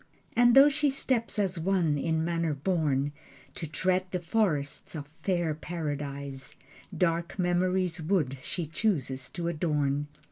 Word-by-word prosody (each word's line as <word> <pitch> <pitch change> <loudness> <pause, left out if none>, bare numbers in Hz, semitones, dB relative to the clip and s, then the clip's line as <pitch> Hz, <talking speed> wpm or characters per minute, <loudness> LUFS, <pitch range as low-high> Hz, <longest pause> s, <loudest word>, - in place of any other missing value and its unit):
And 240 0 +6
though 275 +1 +10
she 290 0 +1
steps 255 -4 0
as 190 -4 +1
one 170 -3 +2
in 160 +2 0
manner 165 -3 0
born 145 -3 0 0.4
To 165 - -5
tread 185 +4 0
the 180 - -2
forests 165 -7 -1
of 145 -2 -5
fair 175 -5 +1
Paradise, 145 -4 -5 0.4
Dark 170 +1 0
memory's 180 -1 +1
wood 155 -6 0
she 170 +5 -3
chooses 150 - -1
to 170 -1 -4
adorn. 150 -3 0
170 Hz, 135 wpm, -29 LUFS, 145-185 Hz, 0.4 s, though